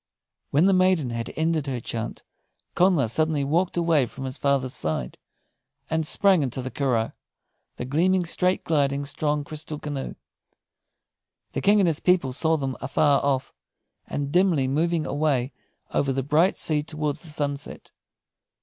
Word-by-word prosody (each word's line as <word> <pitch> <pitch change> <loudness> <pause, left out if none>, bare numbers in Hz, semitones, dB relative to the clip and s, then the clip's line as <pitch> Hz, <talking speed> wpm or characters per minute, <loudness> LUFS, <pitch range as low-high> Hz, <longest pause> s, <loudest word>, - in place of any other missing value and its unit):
When 150 +6 +3
the 195 - +5
maiden 185 -8 +3
had 115 0 -4
ended 160 -2 0
her 130 -3 -2
chant, 115 0 -5 0.5
Connla 175 -8 +3
suddenly 155 +4 +1
walked 170 +6 0
away 165 -6 +3
from 135 - -9
his 130 -1 -4
father's 135 -2 0
side, 65 -6 -2 0.8
and 160 -1 0
sprang 195 -2 +4
into 130 -1 -2
the 130 - -5
curragh, 120 -3 0 0.6
the - - -5
gleaming, 175 +7 +2
straight 180 +2 +1
gliding, 140 -3 +1
strong, 145 +1 -1
crystal 155 +1 -7
canoe. 145 -2 -5 1.4
The - - -3
King 205 +1 +4
and 185 - +3
his 160 -3 +1
people 180 -8 +2
saw 160 +4 +1
them 135 -3 -3
afar 140 +1 +2
off, 135 -2 0 0.5
and 140 -1 -3
dimly 175 -6 +3
moving 160 +4 0
away 140 -3 0 0.4
over 135 - +1
the 135 0 -1
bright 160 +7 +2
sea 150 -2 0
towards 150 -1 -3
the - - -7
sunset. 145 -2 -4
145 Hz, 150 wpm, -25 LUFS, 135-165 Hz, 1.4 s, the